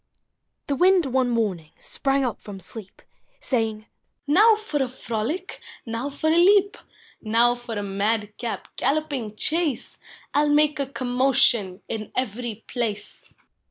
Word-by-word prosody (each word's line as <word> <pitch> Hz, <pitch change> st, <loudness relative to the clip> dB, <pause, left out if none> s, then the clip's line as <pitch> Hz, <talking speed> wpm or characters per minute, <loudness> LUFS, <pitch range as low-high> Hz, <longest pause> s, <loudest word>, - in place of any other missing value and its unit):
The 285 Hz, -, -1 dB
Wind 365 Hz, +2 st, +4 dB
one 260 Hz, -1 st, +1 dB
morning 200 Hz, -9 st, -1 dB
sprang 275 Hz, -1 st, 0 dB
up 240 Hz, -, -3 dB
from 200 Hz, -2 st, -9 dB
sleep. 195 Hz, +2 st, -8 dB, 0.4 s
Saying, 220 Hz, -4 st, -1 dB, 0.2 s
" -, -, -52 dB
Now 420 Hz, +10 st, +6 dB
for 420 Hz, -9 st, -3 dB
a 265 Hz, -, +1 dB
frolic! 255 Hz, -, -4 dB, 0.3 s
now 230 Hz, +4 st, -3 dB
for 300 Hz, +3 st, 0 dB
a 330 Hz, -, +3 dB
leap! 400 Hz, +3 st, +5 dB, 0.5 s
Now 230 Hz, +2 st, +3 dB
for 240 Hz, -2 st, -7 dB
a 205 Hz, -, -2 dB
mad 205 Hz, +2 st, -1 dB
cap 235 Hz, -1 st, -4 dB
galloping 275 Hz, -6 st, -1 dB
chase! 310 Hz, 0 st, -1 dB, 0.3 s
I 285 Hz, -, +3 dB
'11 295 Hz, 0 st, +3 dB
make 295 Hz, -2 st, +3 dB
a 275 Hz, -1 st, -2 dB
commotion 245 Hz, -7 st, +2 dB
in 215 Hz, -2 st, -5 dB
every 235 Hz, -2 st, -3 dB
[dace! 215 Hz, -4 st, -4 dB
245 Hz, 145 wpm, -24 LUFS, 220-290 Hz, 0.5 s, Now